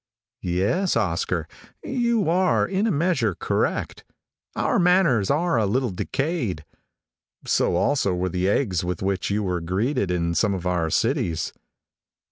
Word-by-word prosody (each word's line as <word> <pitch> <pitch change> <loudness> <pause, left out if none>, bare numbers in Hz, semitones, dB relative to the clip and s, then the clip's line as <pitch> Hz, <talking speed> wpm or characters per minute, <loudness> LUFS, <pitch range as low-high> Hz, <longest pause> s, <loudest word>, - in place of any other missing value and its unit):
Yes, 100 - 0
Oscar, 95 -7 -1 0.4
you 235 -6 0
are, 180 +2 +2
in 195 +3 0
a - - +1
measure, 145 - +1
correct. - - -2 0.5
Our - - +1
manners 175 - +3
are 155 -2 +2
a 105 - +1
little 125 +3 0
decayed. 115 - -2 0.8
So - - +1
also 130 -10 +1
were 90 +1 -1
the 90 +2 0
eggs 100 -5 +1
with 90 0 -3
which 95 -1 -1
you 105 +1 0
were 90 -3 -1
greeted 100 - -1
in 85 -1 0
some 100 +2 +1
of 90 -1 -6
our 90 -3 0
cities. 80 +1 0
105 Hz, 140 wpm, -24 LUFS, -, 0.8 s, manners